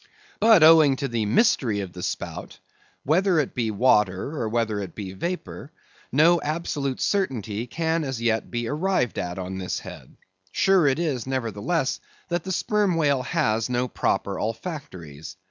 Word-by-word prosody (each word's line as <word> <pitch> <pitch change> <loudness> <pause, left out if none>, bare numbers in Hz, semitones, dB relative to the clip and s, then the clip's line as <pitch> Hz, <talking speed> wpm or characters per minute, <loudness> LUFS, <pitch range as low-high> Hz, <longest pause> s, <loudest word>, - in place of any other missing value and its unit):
But 220 -5 +6
owing 155 -3 +7
to 140 +1 -3
the 115 -4 -1
mystery 120 - +2
of 95 -3 -7
the 90 - -8
spout—whether 175 - -3
it 150 -4 0
be 115 -3 -1
water 105 +2 +2
or 115 -7 -2
whether 110 -2 -1
it 95 -4 -7
be 95 -3 -6
vapor—no 165 - -1
absolute 145 -3 -2
certainty 120 - -1
can 165 +4 -1
as 135 -4 -4
yet 115 -1 0
be 120 -1 -3
arrived 150 - 0
at 90 0 -4
on 95 0 -5
this 90 - -3
head. - - -11 0.3
Sure 190 - +3
it 135 - +2
is, 145 -8 -2
nevertheless, 130 - -1 0.3
that 175 -1 -1
the 190 - -4
Sperm 205 -1 +1
Whale 145 -5 +2
has 115 -2 0
no 125 0 0
proper 100 -4 -1
olfactories. 105 - -6
130 Hz, 150 wpm, -24 LUFS, 110-160 Hz, 0.3 s, owing